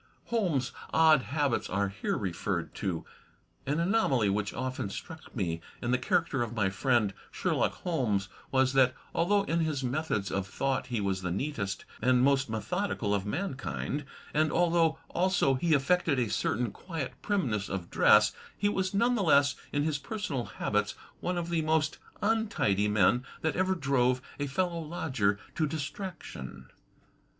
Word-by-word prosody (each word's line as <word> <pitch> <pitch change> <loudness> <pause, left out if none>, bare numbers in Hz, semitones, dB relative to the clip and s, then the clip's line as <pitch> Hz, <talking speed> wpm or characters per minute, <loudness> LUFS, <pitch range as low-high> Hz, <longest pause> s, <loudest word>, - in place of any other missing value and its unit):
Holmes' 175 - +1 0.2
odd 160 -3 +6
habits 140 -1 0
are 100 +1 0
here 100 - -2
referred 90 -2 -2
to: 90 -5 -3 0.6
An 145 +3 +1
anomaly 170 - +2
which 105 0 -1
often 130 -5 -3
struck 160 +10 -9
me 85 -7 -1 0.2
in 120 - -2
the 125 - +3
character 145 0 +1
of 120 0 -2
my 100 -4 +1
friend 115 -2 +2 0.2
Sherlock - - 0
Holmes 115 - 0 0.2
was 130 0 +3
that, 130 -2 +4 0.2
although 200 +4 +3
in 170 -3 0
his 155 -4 0
methods 125 -7 -1
of 95 0 -1
thought 135 +6 -1
he 120 -3 -1
was 95 -2 -1
the 90 - -2
neatest 100 - -3 0.2
and 125 +1 +4
most 135 -2 +3
methodical 115 - -1
of 100 0 -1
mankind, 145 - -3 0.3
and 155 0 +2
although 165 -2 +3
also 180 -6 +2
he 155 +4 +2
affected 150 +1 +2
a 120 -4 0
certain 115 0 0
quiet 160 - -5
primness 125 - 0
of 90 -3 -4
dress, - - +6 0.2
he 205 - +1
was 190 -1 -1
none 235 +5 +3
the 230 - +1
less 140 -5 +5 0.2
in 145 - +1
his 150 -2 0
personal 175 - -3
habits - - -1 0.2
one 180 0 -2
of 170 -1 -2
the 165 -1 +2
most 155 0 +1 0.2
untidy 205 - +2
men 105 +4 +3 0.2
that 160 - 0
ever 185 0 +2
drove 130 -5 +2 0.2
a 145 - -1
fellow 170 +4 -1
lodger 135 -11 0 0.2
to 155 - +1
distraction. 145 - -6
135 Hz, 160 wpm, -30 LUFS, 105-165 Hz, 0.6 s, odd